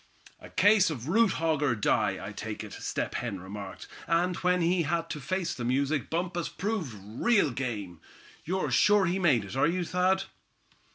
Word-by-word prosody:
"A - - -12
case 205 -1 +4
of 130 -5 -5
'root 225 +7 +3
hog, 160 -3 0
or 140 -5 +2
die,' 105 -2 +1
I 95 - -6
take 105 +1 -6
it," 105 - -9
Step - - -3
Hen 110 -6 -3
remarked; 95 +1 -8 0.2
"and 175 +2 +2
when 180 -1 +1
he 175 +1 +2
had 165 +1 -1
to 150 - -4
face 185 +3 -2
the 125 - -6
music 135 +3 0
Bumpus 175 0 -2
proved 180 - -3
real 140 - +1
game. 105 -9 -4 0.4
You're 185 +3 -1
sure 205 -2 +5
he 180 +2 0
made 135 - +3
it, 100 - -8
are 135 - +3
you, 175 +1 -1
Thad?" 185 +2 +1
160 Hz, 180 wpm, -29 LUFS, 115-180 Hz, 0.4 s, sure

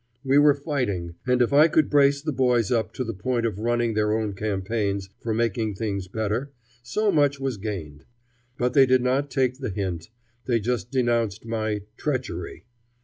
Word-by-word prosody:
We 135 +1 +4
were 145 -1 +6
fighting; 125 - -2
and 125 0 +4
if 120 - -1
I 150 +3 +7
could 155 -2 +3
brace 140 -1 +3
the 155 - -1
boys 125 -4 +2
up 110 -3 +1
to 130 - -3
the 115 -2 -4
point 120 +4 -1
of 105 -4 -2
running 120 0 0
their 105 0 +1
own 110 -2 -2
campaigns 100 -1 -2
for 115 - -3
making 110 -2 0
things 100 -3 -3
better, 110 +7 -2 0.3
so 205 - 0
much 145 -3 +2
was 135 -4 -2
gained. 85 -8 -6 0.5
But 125 0 0
they 135 -1 +6
did 130 -1 +3
not 135 +3 +1
take 130 0 0
the 130 - -3
hint. 90 -3 -4 0.4
They 120 -3 +2
just 110 -3 -2
denounced 115 -5 0
my 110 -2 -2 0.2
"treachery." 130 - -4
115 Hz, 180 wpm, -25 LUFS, 105-130 Hz, 0.5 s, I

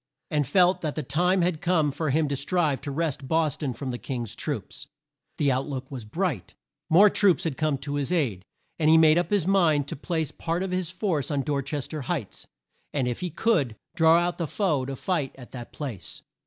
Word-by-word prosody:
and 150 -3 +1
felt 180 +4 +4
that 155 -3 -2
the 155 - -2
time 175 +7 +2
had 170 -3 0
come 160 -5 +2
for 155 +2 -2
him 155 +2 +2
to 140 - -1
strive 150 0 0
to - - -5
wrest 140 -2 -2
Bos 160 -2 +1
ton 150 -4 -3
from 130 +2 -5
the 120 - -5
King's 120 -5 -4
troops. - - -5 0.5
The 140 -2 +2
out 130 +1 -1
look 130 -1 -5
was 125 -5 -6
bright. 115 - -3 0.3
More 185 +6 +7
troops 200 -3 +3
had 160 -5 -1
come 155 -2 0
to 140 +2 -5
his 145 +2 -1
aid, 125 - 0 0.4
and 155 -1 +3
he 160 - +7
made 160 +1 +6
up 175 - -1
his 205 -5 +2
mind 165 -7 +3
to - - -4
place 160 0 -2
part 170 +3 -2
of 190 - -3
his 185 -2 -1
force 180 - -1
on 140 -3 0
Dor 145 -1 0
ches 140 0 -4
ter 155 -2 -5
Heights, 130 - -4 0.4
and, 135 -4 0
if 120 - -2
he 180 - -3
could, 150 - +1 0.2
draw 160 0 +6
out 175 +1 0
the 165 - -1
foe 150 -8 0
to 135 +1 -4
fight 150 -2 -2
at 125 -2 -12
that 120 -2 -8
place. 120 - -7
155 Hz, 220 wpm, -26 LUFS, 135-175 Hz, 0.5 s, More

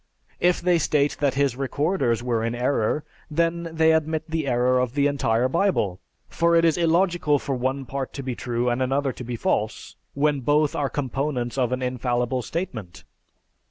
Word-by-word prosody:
If 180 0 +2
they 175 -1 +3
state 145 -1 +1
that 140 -3 +1
his 140 -3 +1
recorders 135 -3 0
were 120 -2 0
in 115 +1 -1
error, 125 +2 0 0.3
then 170 +2 0
they 160 0 +3
admit 160 0 0
the 160 -3 -2
error 125 0 +2
of 125 0 -1
the 140 -1 +2
entire 130 -4 +1
Bible, 130 - 0 0.3
for 170 +1 +2
it 165 0 +4
is 165 - +3
illogical 170 -2 +2
for 140 - -3
one 130 +2 -2
part 135 0 -4
to 140 - -6
be 130 -1 -3
true 120 0 -2
and 120 +1 0
another 135 +1 +1
to 125 - -8
be 120 0 -4
false, - - -2 0.2
when 145 0 +2
both 145 +3 +2
are 140 -2 0
components 135 -2 -2
of 125 -3 0
an 130 0 -2
infallible 125 0 -1
statement. 120 - -5
140 Hz, 180 wpm, -24 LUFS, 125-160 Hz, 0.3 s, it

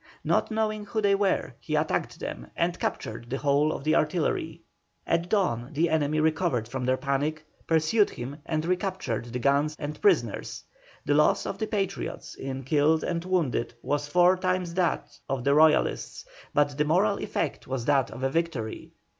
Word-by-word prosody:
Not - - +1
knowing 215 -1 -1
who 220 +2 -2
they 200 -2 +3
were, 195 -1 +1
he - - -3
attacked - - -1
them - - -6
and 170 +1 0
captured 115 +2 -4
the 135 - -2
whole 145 +2 +2
of 140 - -5
the 155 +1 +2
artillery. 160 +1 0 0.4
At 170 +1 0
dawn 155 - 0
the 160 +3 +1
enemy 155 -1 +1
recovered 155 -7 +1
from 125 +1 -4
their 130 +1 +2
panic, 150 +3 -1 0.2
pursued 165 +7 +3
him 130 +4 -7
and 155 0 -1
recaptured 180 - -1
the 120 +1 -5
guns 140 +4 +2
and 150 +1 -6
prisoners. 410 - +1 0.4
The - - +2
loss - - +3
of - - -4
the 220 - -1
Patriots 195 -3 -3
in 135 0 -5
killed 150 +4 +2
and 170 -1 -2
wounded 165 -10 0
was 145 +1 -1
four 180 +4 +4
times 185 -2 -1
that 175 -3 -1
of 135 -2 -1
the 140 +1 +3
Royalists, 155 - +3 0.3
but 145 -1 +1
the 150 - +3
moral 195 +6 +2
effect 165 -8 -3
was 130 -3 -3
that 135 -3 +3
of 130 - -8
a 135 - +2
victory. 140 -9 -3
155 Hz, 175 wpm, -27 LUFS, 135-180 Hz, 0.4 s, four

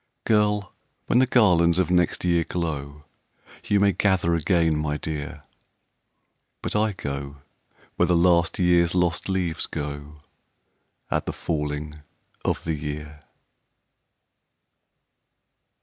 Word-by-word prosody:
Girl! 105 -2 +1 0.3
when 125 - +3
the 130 - +4
garlands 90 -9 +4
of 90 -1 +1
next 90 0 +1
year 85 -1 +2
glow, 75 -4 -4 0.6
YOU 105 - +2
may 100 0 +4
gather 95 -4 +1
again, 85 0 +2
my 75 -1 -1
dear 75 0 -6 1.2
But - - -3
I 105 0 +2
go 70 -3 -6 0.5
where 90 - +3
the 90 - +3
last 85 -1 +3
year's 90 -1 +3
lost 90 +1 0
leaves 90 -4 -1
go 75 +1 -6 0.9
At - - -1
the - - -2
falling 75 -1 -4 0.4
of - - -1
the 80 - -1
year." 75 0 -6
85 Hz, 115 wpm, -24 LUFS, 75-90 Hz, 1.2 s, the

